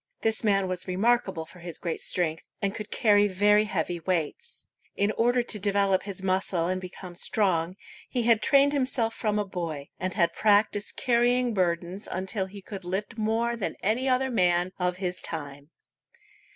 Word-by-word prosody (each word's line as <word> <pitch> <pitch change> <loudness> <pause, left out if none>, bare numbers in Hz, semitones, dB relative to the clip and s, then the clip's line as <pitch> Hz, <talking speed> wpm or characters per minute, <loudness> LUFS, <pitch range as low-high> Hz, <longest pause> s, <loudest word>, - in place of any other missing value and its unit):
This 220 0 +1
man 195 -3 +2
was 185 0 -4
remarkable 190 -3 +1
for 180 - -15
his 170 -1 -6
great 170 -3 -4
strength, 165 -3 -1
and 195 -1 -1
could 215 -1 -6
carry 205 -2 +4
very 205 +2 +4
heavy 185 -4 -2
weights. 180 - -3 0.3
In 200 +1 +1
order 240 +3 +2
to 215 -2 +1
develop 200 -1 +2
his 195 -2 -7
muscle 185 -2 +1
and 185 +1 -1
become 185 0 -9
strong, 180 -2 0 0.3
he 245 -2 -1
had 230 -2 +4
trained 280 +3 +4
himself 255 -4 0
from 210 -2 -1
a 210 - 0
boy, 165 -7 -5
and 185 0 -3
had 170 -4 +2
practiced 205 -1 +2
carrying 245 0 +2
burdens 180 +1 -1
until 190 +1 -2
he 195 0 -11
could 195 -2 -8
lift 200 +6 -4
more 225 +2 0
than 230 - -3
any 235 +6 +1
other 260 +1 +1
man 180 -4 +2
of 180 0 0
his 180 -1 -3
time. 145 -2 -6
195 Hz, 170 wpm, -27 LUFS, 180-220 Hz, 0.3 s, carry